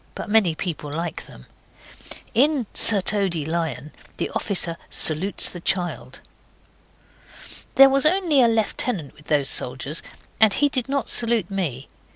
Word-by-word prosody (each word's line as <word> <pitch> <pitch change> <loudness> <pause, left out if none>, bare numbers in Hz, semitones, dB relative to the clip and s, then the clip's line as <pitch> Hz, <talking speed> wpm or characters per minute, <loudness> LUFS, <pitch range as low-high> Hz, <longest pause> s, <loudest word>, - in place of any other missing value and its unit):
But - - -7
many 205 -7 +3
people 155 -4 -5
like 165 +1 -5
them. 60 - -15 0.9
In 275 +1 +2
Sir 205 -3 +4
Toady 185 -6 0
Lion 155 -4 -4 0.3
the - - -3
officer 175 -4 -1
salutes 165 +6 +1
the 175 - -6
child. 175 0 -3 1.5
There 270 - +9
was 275 +2 +3
only 335 -5 +2
a 240 - +5
lieutenant 220 - -1
with 150 - -20
those 145 -3 +1
soldiers, 130 +6 -2 0.4
and 215 -3 +5
he 290 0 +2
did 260 -2 -2
not 280 -1 -1
salute 230 -5 +1
me. 150 -9 -4
190 Hz, 140 wpm, -22 LUFS, 155-240 Hz, 1.5 s, There